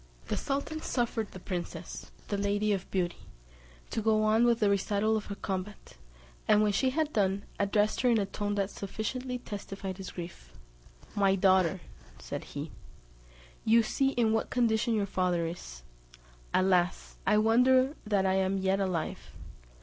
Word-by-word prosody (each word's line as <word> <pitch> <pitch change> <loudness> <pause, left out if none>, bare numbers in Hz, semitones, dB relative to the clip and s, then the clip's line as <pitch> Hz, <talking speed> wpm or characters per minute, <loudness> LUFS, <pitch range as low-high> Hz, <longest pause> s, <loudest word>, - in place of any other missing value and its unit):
The - - 0
sultan 285 +3 -2
suffered 235 -6 -1
the 185 - -10
princess, 175 -2 -6 0.2
the 205 - 0
Lady 205 +1 +1
of 195 -1 -4
Beauty, 180 -2 -1 0.7
to 225 - -1
go 215 0 +3
on 220 +2 +4
with 235 -1 +3
the 210 - +3
recital 200 +2 +1
of 215 - -2
her 200 - -5
combat, 195 +1 -5 0.5
and 215 0 +5
when 210 - +3
she 260 +7 +2
had 305 +2 -1
done, 195 -1 +1 0.2
addressed 205 +1 +2
her 250 - +3
in 235 - +4
a 205 - +1
tone 205 +1 -3
that 200 0 -1
sufficiently 250 +6 -4
testified 195 -4 -6
his 190 -2 -6
grief; 170 - -9 0.6
"My 195 -1 +3
daughter," 185 -2 +3 0.4
said - - -6
he, - - -4 0.9
"you 230 +1 +5
see 270 +5 +1
in 225 -2 +2
what 225 - 0
condition 235 -1 +2
your 205 -2 +1
father 180 -3 0
is; 60 - -7 0.7
alas! 180 -1 +1
I 210 - +5
wonder 255 +5 +4
that 205 -2 +1
I 190 - +3
am 190 0 +1
yet 190 +1 +1
alive! 180 -5 -1
205 Hz, 160 wpm, -30 LUFS, 190-225 Hz, 0.9 s, and